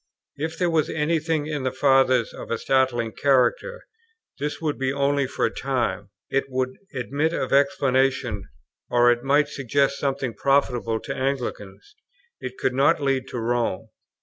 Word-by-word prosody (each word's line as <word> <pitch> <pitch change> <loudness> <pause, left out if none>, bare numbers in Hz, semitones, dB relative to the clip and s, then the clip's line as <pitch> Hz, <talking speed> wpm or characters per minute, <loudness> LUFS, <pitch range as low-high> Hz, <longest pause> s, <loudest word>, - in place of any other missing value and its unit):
If 160 +3 -4
there 175 -2 +1
was 155 -2 +1
any 160 +2 0
thing 155 -1 -1
in 150 -2 -3
the 130 0 -1
Fathers 130 -2 +3
of - - -9
a 115 - 0
startling 125 -3 +1
character, 135 - +1 0.6
this 150 +1 -3
would 155 -4 -2
be 130 0 0
only 140 0 +1
for - - -1
a - - -1
time; 120 -7 -2 0.2
it 135 - +1
would 130 0 -2 0.2
admit 140 +5 -1
of 130 - -2
explanation, 135 - +1 0.4
or 120 0 +5
it 120 0 0
might 145 +3 +3
suggest 140 0 0
something 135 -3 -1
profitable 125 -5 +1
to - - -5
Anglicans; 130 - -4 0.5
it - - -7
could 125 - 0
not 135 +3 +3
lead 135 -2 0
to - - -6
Rome. 115 -3 -1
135 Hz, 160 wpm, -24 LUFS, 125-145 Hz, 0.6 s, or